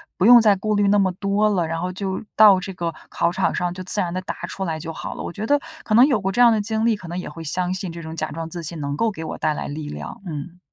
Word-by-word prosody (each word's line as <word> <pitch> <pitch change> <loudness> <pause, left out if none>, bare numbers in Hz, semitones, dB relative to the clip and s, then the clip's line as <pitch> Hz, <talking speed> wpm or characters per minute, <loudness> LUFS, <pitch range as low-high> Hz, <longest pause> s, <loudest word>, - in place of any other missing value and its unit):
不 185 - +1
用 240 +1 +10
再 210 -3 +5
顾 215 +2 -1
虑 205 -1 +3
那 205 +1 +4
么 190 -2 +2
多 200 +3 +1
了， 180 -5 0
然 165 +1 -3
后 180 +1 -2
就 190 +2 -4
到 210 -3 +8
这 195 0 -6
个 170 -2 -3 0.2
考 170 - +1
场 - - 0
上 175 -1 -1
就 185 0 -7
自 195 +3 -2
然 175 -3 -1
地 185 - -2
答 - - -5
出 195 - -5
来 160 -3 -2
就 165 +1 -6
好 - - -6
了。 - - -6
我 - - -5
觉 210 +1 -4
得 290 +2 +3 0.2
可 215 - -2
能 245 - +8
有 245 -9 +1
过 195 - -1
这 215 - -3
样 240 -1 +8
的 215 - +1
经 220 +2 -1
历， 230 -2 +3
可 180 -4 -10
能 175 - -4
也 - - -6
会 165 - -9
相 180 +3 -1
信 185 -2 -4
这 170 0 -8
种 160 0 -7
假 155 -1 -3
装 165 +1 -5
自 170 -1 -6
信 165 +1 -4
能 140 -1 -3
够 225 +6 +1
给 160 -4 -7
我 - - -5
带 155 - 0
来 - - -5
力 150 +1 -6
量， 75 - -8
嗯。 170 +2 -7
185 Hz, 340 characters per minute, -22 LUFS, 165-205 Hz, 0.2 s, 用